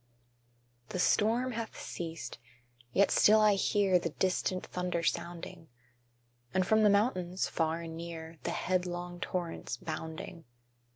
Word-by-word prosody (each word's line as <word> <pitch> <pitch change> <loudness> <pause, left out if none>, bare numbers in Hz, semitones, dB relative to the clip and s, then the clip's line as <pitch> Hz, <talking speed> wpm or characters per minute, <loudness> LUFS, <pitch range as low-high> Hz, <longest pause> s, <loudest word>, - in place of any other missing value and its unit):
_ - - -32
The - - -3
storm 230 +7 +3
hath 230 -1 -5
ceased: 165 -9 -6 0.5
yet 200 +9 +4
still 215 +1 +6
I 215 -1 +6
hear 195 -1 +3
The 170 - -2
distant 185 +2 0
thunder 180 -2 -2
sounding, 170 0 -3 0.9
And 185 -1 +3
from 220 +3 +4
the 210 - +6
mountains, 190 -4 +1
far 165 0 0
and 165 -1 -7
near, 165 -1 -7
The - - -3
headlong 180 -1 -2
torrents 175 -2 -3
bounding. 160 +1 -6
180 Hz, 130 wpm, -32 LUFS, 165-200 Hz, 0.9 s, still